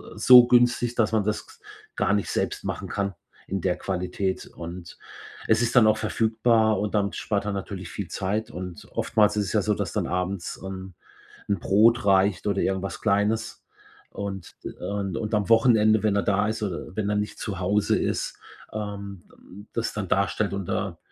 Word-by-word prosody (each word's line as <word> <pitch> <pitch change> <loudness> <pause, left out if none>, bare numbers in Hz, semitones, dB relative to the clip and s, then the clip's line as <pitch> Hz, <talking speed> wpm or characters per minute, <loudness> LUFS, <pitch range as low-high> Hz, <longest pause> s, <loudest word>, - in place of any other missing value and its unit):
so 125 -1 +8
günstig, 120 -1 +3
dass 110 -1 +1
man 105 -2 +3
das 105 +1 -2
gs - - -18 0.3
gar - - +1
nicht 100 -1 0
selbst - - -2
machen - - -4
kann 100 -2 -2 0.3
in 95 -1 -3
der 90 -1 0
Qualität. 95 0 -3
Und 85 0 -9 0.5
es 110 +2 +3
ist 120 - 0
dann 110 - +7
auch 110 - +4
verfügbar 110 -1 +2
und 105 0 -2
damit 100 -1 0
spart 100 -1 -2
er 105 - -2
natürlich 95 -2 -5
viel 100 -3 -6
Zeit. 105 +4 -2
Und 90 -3 -8
oftmals 105 -1 +2
ist 105 - +1
es - - -4
ja - - +3
so, - - +1
dass - - -3
dann - - -1
abends, 90 0 -3
ähm, 95 -1 -7 0.5
'n 100 -3 0
Brot 115 +6 +4
reicht 95 -1 +3
oder 100 -1 +1
irgendwas 95 -2 -2
Kleines. 105 +2 0 0.5
Und 95 -3 -6 0.3
und 100 -2 -3
und 110 0 -4
am 105 -2 +1
Wochenende, 110 -2 +4
wenn 105 -2 +2
er 100 - +1
da 105 +1 +1
ist 110 0 -3
oder 95 -4 -4
wenn 105 -1 0
er 105 - 0
nicht 105 +1 -3
zu 100 -4 -4
Hause 100 +3 +1
ist, - - -2 0.4
ähm, 100 -3 -6
hm, 100 +3 -15
das 115 0 -2
dann 100 -4 -4
darstellt 100 +1 +1
und 100 -1 -3
da - - -3
100 Hz, 190 wpm, -25 LUFS, 95-110 Hz, 0.5 s, so